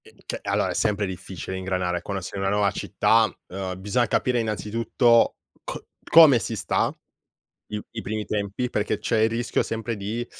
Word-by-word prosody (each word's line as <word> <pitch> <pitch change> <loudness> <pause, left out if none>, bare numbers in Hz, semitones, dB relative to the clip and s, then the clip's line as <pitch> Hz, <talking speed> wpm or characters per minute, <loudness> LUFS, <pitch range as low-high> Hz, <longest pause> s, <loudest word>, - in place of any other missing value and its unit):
Eh, - - -18
che - - -4
allora, - - 0
è - - -2
sempre 105 -1 +1
difficile 95 -1 -6
ingranare 90 -2 -1
quando 100 +1 -4
sei 100 - -6
in 95 - -1
una 95 - +1
nuova 100 -1 +2
città, 110 +1 +2 0.2
ehm, 95 0 -5
bisogna 105 +5 +1
capire, 125 +3 +1
innanzitutto, 115 +2 +2 0.3
co - - -7 0.2
come 155 -7 +8
si 115 - -3
sta 100 -4 0 0.8
i 105 0 -3
i 115 - -5
primi 110 0 -3
tempi 105 +4 -2
perché 105 -1 -1
c'è 110 +1 0
il 110 - +4
rischio, 115 +1 0
sempre, 115 +1 -3
di 110 +4 -3
105 Hz, 180 wpm, -24 LUFS, 95-115 Hz, 0.8 s, come